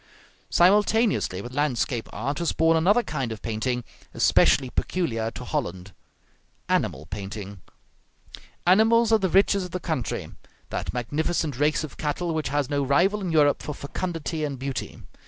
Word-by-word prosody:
Simultaneously 205 - +3
with 120 - -8
landscape 130 -4 -1
art 140 +7 -3
was 170 - 0
born 165 0 +3
another 195 +9 +3
kind 135 - -3
of 110 - -7
painting, 120 +2 -2 0.3
especially 130 -2 +4
peculiar 115 -12 -1
to 125 +2 -8
Holland, 95 -3 -4 0.7
animal 75 +3 0
painting. 100 +1 -7 1.0
Animals 225 +5 +5
are 220 - +5
the 190 -2 0
riches 195 +2 +3
of 180 - -6
the 185 - -4
country; 160 -9 -3 0.4
that - - -3
magnificent 145 +3 -2
race 150 +1 +2
of 155 - -8
cattle 165 +3 -2
which 155 -5 -2
has 145 -1 0
no 145 -1 0
rival 175 +10 +2
in 180 -3 -2
Europe 145 -3 +3
for 150 - -5
fecundity 160 +1 -4
and 140 -3 -3
beauty. 135 0 -5
145 Hz, 150 wpm, -25 LUFS, 125-175 Hz, 1.0 s, Animals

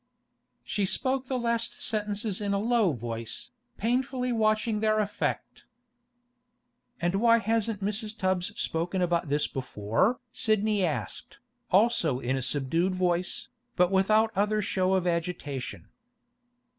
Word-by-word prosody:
She 200 -2 -1
spoke 260 +4 -1
the 260 - -1
last 235 -1 -1
sentences 210 -1 -2
in 200 -1 0
a - - +2
low 220 -2 +2
voice, 115 -3 -5 0.3
painfully 250 +3 0
watching 215 -1 +1
their 215 0 +2
effect. 205 -1 -2 1.3
'And 175 +4 0
why 230 -1 +6
hasn't 225 -1 0
Mrs. 210 +2 -2
Tubbs 185 +2 -1
spoken 175 +3 -1
about 170 -3 0
this 145 +1 +1
before?' 125 - 0
Sidney 215 -3 +1
asked, 135 - -3 0.3
also 180 - +3
in 130 +1 -1
a 135 - -1
subdued 145 +8 0
voice, 180 -1 -1 0.3
but 180 0 +3
without 215 +3 +3
other 210 +2 +2
show 190 -2 +1
of 185 -2 0
agitation. 170 -6 -3
200 Hz, 125 wpm, -28 LUFS, 170-220 Hz, 1.3 s, why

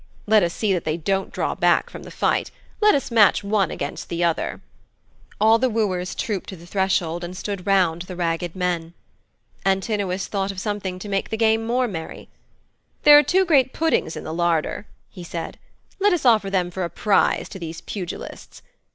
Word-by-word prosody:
Let 215 0 +5
us 170 -2 +1
see 205 +2 0
that 180 - -1
they 155 +1 -1
don't 195 +4 -1
draw - - -1
back - - +2
from - - -9
the - - -10
fight. - - 0 0.3
Let 420 0 +6
us 275 -3 -2
match 210 -2 +5
one 200 -3 +1
against 140 - -5
the 170 0 -1
other.' 170 -1 -1 0.8
All 220 +2 +5
the 255 +1 +2
wooers 190 -5 -1
trooped 205 -5 -3
to 190 - -7
the 170 -1 -14
threshold 175 -3 0
and 180 +1 -6
stood 200 -1 -5
round 180 -4 +2
the 180 +1 -7
ragged 170 0 -2
men. 175 -2 -2 0.7
Antinous 195 -1 0
thought 195 -1 -2
of 195 - -7
something 200 -3 -3
to 185 - -8
make 195 -1 -2
the 220 - -2
game 225 0 +2
more 250 +1 +1
merry. 165 -7 -7 0.7
'There 295 0 +9
are - - +6
two 375 +6 +2
great 275 -7 +3
puddings 320 - 0
in - - -6
the 155 - -5
larder,' 170 +4 0 0.2
he 180 - -10
said. 170 -1 -6 0.4
'Let 405 0 +4
us 345 - -1
offer 220 -5 +4
them 180 -2 0
for 185 +1 -3
a 170 - -2
prize 205 +2 +1
to 190 - -9
these 165 -1 -7
pugilists. 180 -4 -7
195 Hz, 195 wpm, -22 LUFS, 175-220 Hz, 0.8 s, There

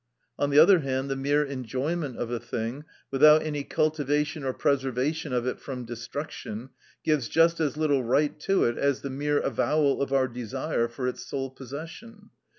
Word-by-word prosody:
(74) - - 0
On 145 - +2
the 140 - +2
other 180 +3 +7
hand, 135 -1 -2
the - - 0
mere 145 +2 +2
enjoyment 135 +2 -3
of 120 0 -3
a 120 - -1
thing, 120 +8 -4 0.3
without 150 +3 +6
any 150 -2 -3
cultivation 150 0 0
or 130 - 0
preservation 135 +3 0
of 125 -1 0
it 125 - -2
from 125 -3 -6
destruction, 120 0 -6 0.3
gives 150 -6 +1
just 165 +1 +4
as 150 -3 0
little 145 -4 +2
right 145 +5 +1
to 195 +5 +2
it 120 - 0
as 140 -1 +1
the 140 - -4
mere 145 +2 0
avowal 140 +3 +1
of 140 - -1
our 135 -1 +3
desire 125 +1 -2
for 125 +2 -4
its 125 - -4
sole 135 -1 -4
possession. 165 - -10
140 Hz, 180 wpm, -27 LUFS, 130-150 Hz, 0.3 s, other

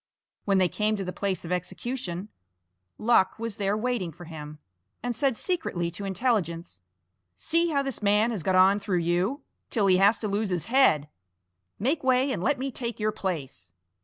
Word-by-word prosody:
When 195 -2 +3
they 185 -1 +4
came 210 +4 0
to 200 - -3
the 180 - -4
place 190 -2 -2
of 165 - -6
execution 185 +1 -4 0.7
Luck 215 -4 +3
was 230 -2 -5
there 200 0 0
waiting 220 -7 -1
for 175 +3 -12
him, 150 -2 -8 0.5
and 245 -1 -2
said 260 0 +1
secretly 185 - -2
to 200 +4 -6
Intelligence: 180 - -1 0.5
"See 335 - +1
how 280 -3 +1
this 270 -5 -4
man 210 +3 +3
has 210 -6 -3
got 185 +3 +1
on 190 +2 +6
through 195 -3 -1
you, 175 - 0 0.3
till 215 -5 +1
he 185 -2 +5
has 200 +4 +5
to 215 - -3
lose 205 +1 -1
his 180 -3 -1
head! 230 - +4 0.7
Make 275 +9 0
way, 260 +1 +3
and 195 - -2
let 285 +7 +1
me 270 +1 -3
take 235 -2 -5
your 215 0 +1
place!" 135 - -5
200 Hz, 185 wpm, -27 LUFS, 180-240 Hz, 0.7 s, on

